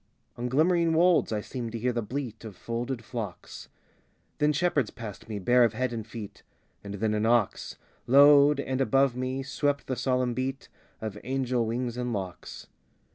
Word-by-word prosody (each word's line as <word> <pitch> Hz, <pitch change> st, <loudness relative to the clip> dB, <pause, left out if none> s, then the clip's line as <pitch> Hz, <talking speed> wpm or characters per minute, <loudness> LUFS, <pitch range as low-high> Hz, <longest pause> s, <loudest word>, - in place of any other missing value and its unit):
On 120 Hz, +1 st, -3 dB
glimmering 165 Hz, +4 st, +3 dB
wolds 175 Hz, -3 st, +4 dB
I 105 Hz, -1 st, -1 dB
seemed 120 Hz, 0 st, -6 dB
to -, -, -2 dB
hear 125 Hz, +2 st, -1 dB
the 120 Hz, -, -1 dB
bleat 120 Hz, +1 st, -5 dB
Of 110 Hz, -4 st, -8 dB
folded 120 Hz, +4 st, -4 dB
flocks: 105 Hz, -8 st, -7 dB, 0.7 s
Then 150 Hz, 0 st, +3 dB
shepherds 145 Hz, -6 st, +1 dB
passed 110 Hz, -1 st, -9 dB
me, 105 Hz, -, -3 dB
bare 120 Hz, +6 st, +4 dB
of 115 Hz, -2 st, +2 dB
head 130 Hz, +2 st, -1 dB
and 110 Hz, -2 st, -5 dB
feet; 110 Hz, -3 st, -9 dB, 0.4 s
And 100 Hz, 0 st, -6 dB
then 110 Hz, +1 st, 0 dB
an 105 Hz, +1 st, +1 dB
ox 115 Hz, -4 st, +1 dB, 0.3 s
Lowed; 145 Hz, +2 st, +7 dB
and, 130 Hz, -1 st, -2 dB
above 135 Hz, -1 st, +3 dB
me, 130 Hz, +1 st, -3 dB
swept 140 Hz, +1 st, -1 dB
the 130 Hz, -, -2 dB
solemn 125 Hz, -1 st, 0 dB
beat 130 Hz, +2 st, -4 dB, 0.3 s
Of 105 Hz, -2 st, -5 dB
angel 130 Hz, -3 st, -1 dB
wings 120 Hz, +1 st, -3 dB
and 125 Hz, -1 st, -2 dB
locks. 95 Hz, -4 st, -6 dB
125 Hz, 175 wpm, -28 LUFS, 110-135 Hz, 0.7 s, Lowed